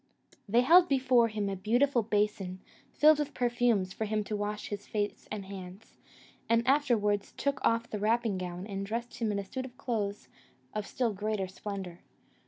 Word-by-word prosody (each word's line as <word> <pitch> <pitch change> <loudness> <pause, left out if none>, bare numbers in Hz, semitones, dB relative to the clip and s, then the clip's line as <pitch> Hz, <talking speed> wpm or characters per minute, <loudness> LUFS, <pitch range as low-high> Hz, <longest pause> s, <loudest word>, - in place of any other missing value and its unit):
They 235 +4 +5
held 345 +7 +6
before 255 -3 +4
him 210 -2 -2
a 195 - -2
beautiful 240 +7 +2
basin, 205 -3 -1 0.3
filled 305 0 +5
with 295 -1 -3
perfumes, 240 -6 +1
for 220 - -3
him 215 0 -1
to 210 - -3
wash 210 0 -3
his 205 -1 -6
face 205 -1 -3
and 210 -2 -4
hands, 190 +1 -10 0.5
and 230 +2 +3
afterwards 230 -8 +2
took 280 0 -1
off 230 0 +2
the 210 - -4
wrapping 220 -2 +1
gown, 180 0 -5
and 195 -2 -4
dressed 230 +4 -4
him 225 -3 0
in 205 - -1
a 200 - -3
suit 260 +6 -5
of 250 -1 -12
clothes 215 -7 -3 0.5
of 210 -1 -3
still 240 -4 -1
greater 205 -1 -2
splendour. 190 -2 -6
215 Hz, 180 wpm, -30 LUFS, 200-240 Hz, 0.5 s, held